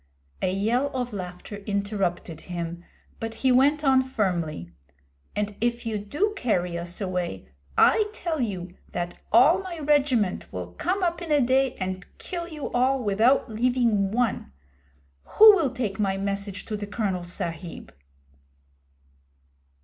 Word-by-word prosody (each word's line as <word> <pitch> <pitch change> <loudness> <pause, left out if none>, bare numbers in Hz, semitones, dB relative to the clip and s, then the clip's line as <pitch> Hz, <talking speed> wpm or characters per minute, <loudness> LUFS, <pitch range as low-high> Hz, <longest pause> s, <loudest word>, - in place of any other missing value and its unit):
A 185 - +1
yell 225 +8 +1
of 245 -2 -3
laughter 180 +1 -6
interrupted 200 -5 -2
him, 170 -1 -5 0.4
but 225 0 -4
he 260 - +2
went 285 +4 +4
on 265 -2 +5
firmly 175 - -2 0.6
'And 210 0 -2
if 235 0 0
you 220 -2 -1
do 300 - -1
carry 180 - 0
us 170 +1 -4
away, 180 - -3 0.3
I 425 -1 +5
tell 330 -8 -3
you 185 -6 -3 0.2
that 175 0 -4
all 275 - +6
my 370 -3 -6
regiment 280 - +1
will 90 -1 -6
come 370 +3 -1
up 345 -1 0
in 335 -3 -5
a 295 - +5
day 265 0 +2
and 185 -1 -4
kill 345 -2 -5
you 310 -4 -6
all 255 +1 +2
without 220 +6 +3
leaving 230 -3 +1
one. 225 - -1 0.9
Who 435 0 +11
will 325 -8 +1
take 225 -6 -3
my 195 -2 +1
message 200 0 -3
to 215 - -3
the 205 -1 -5
Colonel 200 -4 -2
Sahib?' 175 -1 -6
215 Hz, 140 wpm, -26 LUFS, 185-265 Hz, 0.9 s, Who